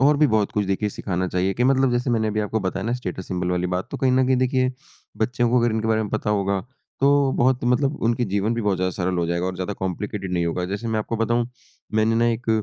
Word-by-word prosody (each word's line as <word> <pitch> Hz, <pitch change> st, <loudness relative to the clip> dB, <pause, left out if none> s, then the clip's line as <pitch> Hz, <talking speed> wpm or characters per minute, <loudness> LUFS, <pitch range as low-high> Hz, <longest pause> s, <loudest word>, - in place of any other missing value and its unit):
और 145 Hz, +2 st, +5 dB
भी 150 Hz, +1 st, +5 dB
बहुत 110 Hz, -5 st, +1 dB
कुछ 105 Hz, -, 0 dB
देखिए 100 Hz, +2 st, 0 dB
सिखाना 95 Hz, -2 st, -3 dB
चाहिए 90 Hz, +2 st, 0 dB
कि 120 Hz, -, +1 dB
मतलब 135 Hz, 0 st, +3 dB
जैसे 120 Hz, +1 st, 0 dB
मैंने 110 Hz, -2 st, +1 dB
अभी 105 Hz, 0 st, -1 dB
आपको 105 Hz, +1 st, -1 dB
बताया 95 Hz, 0 st, -2 dB
ना 120 Hz, -, 0 dB
स्टेटस 95 Hz, -7 st, -5 dB
सिंबल 90 Hz, -1 st, -1 dB
वाली 90 Hz, 0 st, 0 dB
बात 90 Hz, -, -4 dB
तो -, -, -4 dB
कहीं 130 Hz, -1 st, +2 dB
न 130 Hz, 0 st, +3 dB
कहीं 130 Hz, 0 st, +3 dB
देखिए 130 Hz, 0 st, +1 dB, 0.4 s
बच्चों 120 Hz, +2 st, +1 dB
को 125 Hz, -, +4 dB
अगर 120 Hz, 0 st, +2 dB
इनके 110 Hz, 0 st, -1 dB
बारे 110 Hz, 0 st, +2 dB
में 105 Hz, -, -5 dB
पता 105 Hz, -, -1 dB
होगा 100 Hz, -1 st, +1 dB, 0.4 s
तो 140 Hz, -1 st, +4 dB
बहुत 125 Hz, 0 st, +2 dB
मतलब 135 Hz, +4 st, +2 dB
उनके 120 Hz, +1 st, +1 dB
जीवन 100 Hz, +3 st, 0 dB
भी 115 Hz, -, -2 dB
बहुत 100 Hz, -2 st, +1 dB
ज़्यादा 95 Hz, +1 st, 0 dB
सरल 90 Hz, 0 st, -2 dB
हो 85 Hz, -, +1 dB
जाएगा 85 Hz, +1 st, -1 dB
और 95 Hz, -, -2 dB
ज़्यादा 95 Hz, +2 st, -3 dB
कॉम्प्लिकेटेड 95 Hz, +1 st, -3 dB
नहीं 85 Hz, -1 st, +1 dB
होगा। 90 Hz, +2 st, -1 dB
जैसे 100 Hz, +5 st, -4 dB
मैं 110 Hz, -1 st, 0 dB
आपको 110 Hz, +2 st, -2 dB
बताऊँ 120 Hz, +1 st, +1 dB, 0.5 s
मैंने 110 Hz, +1 st, +3 dB
ना 115 Hz, +1 st, +3 dB
एक 115 Hz, 0 st, -2 dB
110 Hz, 260 wpm, -23 LUFS, 95-125 Hz, 0.5 s, और